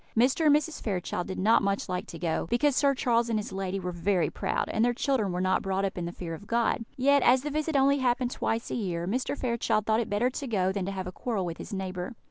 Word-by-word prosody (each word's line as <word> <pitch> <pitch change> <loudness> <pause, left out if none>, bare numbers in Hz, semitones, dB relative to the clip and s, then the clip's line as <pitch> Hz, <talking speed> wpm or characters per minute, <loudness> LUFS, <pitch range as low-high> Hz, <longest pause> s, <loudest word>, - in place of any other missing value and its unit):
Mr. 265 +7 +3
and 290 - +7
Mrs. 305 +1 -1
Fairchild 180 -3 -2
did 190 - -5
not 220 +5 +4
much 200 0 -1
like 180 -1 -3
to 170 - -8
go, 165 0 -1
because 280 +3 +2
Sir 280 -1 +3
Charles 235 -2 +1
and 225 - +1
his 210 - -4
lady 190 0 -3
were 180 -1 -3
very 175 +1 0
proud, - - -1
and 220 - +1
their 240 0 +2
children 245 -7 0
were 180 - -2
not 185 0 +2
brought 195 0 -1
up 195 - -3
in 175 - -3
the 170 - -4
fear 175 -2 -6
of 180 +6 -9
God; 235 0 +1
yet, 280 +2 +4
as 255 +1 +4
the 295 - -3
visit 310 +1 -1
only 275 +1 +4
happened 250 -1 +1
twice 225 -1 -2
a - - -1
year, 175 -7 -2
Mr. 255 +7 -1
Fairchild 235 -3 0
thought 220 0 +2
it 235 - -2
better 215 +5 +1
to 275 +1 -5
go 190 -5 +1
than 190 -1 -3
to - - -2
have 190 -1 -4
a 180 - -5
quarrel 205 -1 -2
with 170 -1 -5
his - - -8
neighbour. 190 +2 -4
215 Hz, 270 wpm, -28 LUFS, 185-250 Hz, -, and